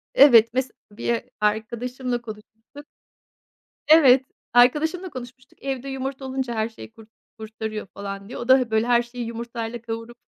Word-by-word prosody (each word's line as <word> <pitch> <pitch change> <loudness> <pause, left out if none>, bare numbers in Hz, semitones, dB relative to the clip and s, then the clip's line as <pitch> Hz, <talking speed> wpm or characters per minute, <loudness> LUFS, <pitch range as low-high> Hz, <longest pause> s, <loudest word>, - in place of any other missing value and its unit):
Evet, 230 -5 +7
mes 260 -1 -1 0.2
bir 230 +3 -2 0.2
arkadaşımla 240 +4 -2
konuşmuştuk. 225 +5 -12 1.0
Evet, 270 -4 +7 0.3
arkadaşımla 315 +9 +3
konuşmuştuk. 255 -1 -11
Evde 270 -1 -4
yumurta 270 0 -5
olunca 260 -2 -3
her 220 0 -1
şeyi 225 0 -12
kur 225 0 -16 0.3
kurtarıyor, 220 -1 -6
falan, 200 +1 -8
diye. - - -7
O 240 - -6
da 260 +1 +7
he 245 -3 -3
böyle 220 +1 +1
her 240 -1 +4
şeyi 240 0 -7
yumurtayla 230 0 -6
kavurup 230 +1 -7
240 Hz, 145 wpm, -23 LUFS, 225-260 Hz, 1.0 s, Evet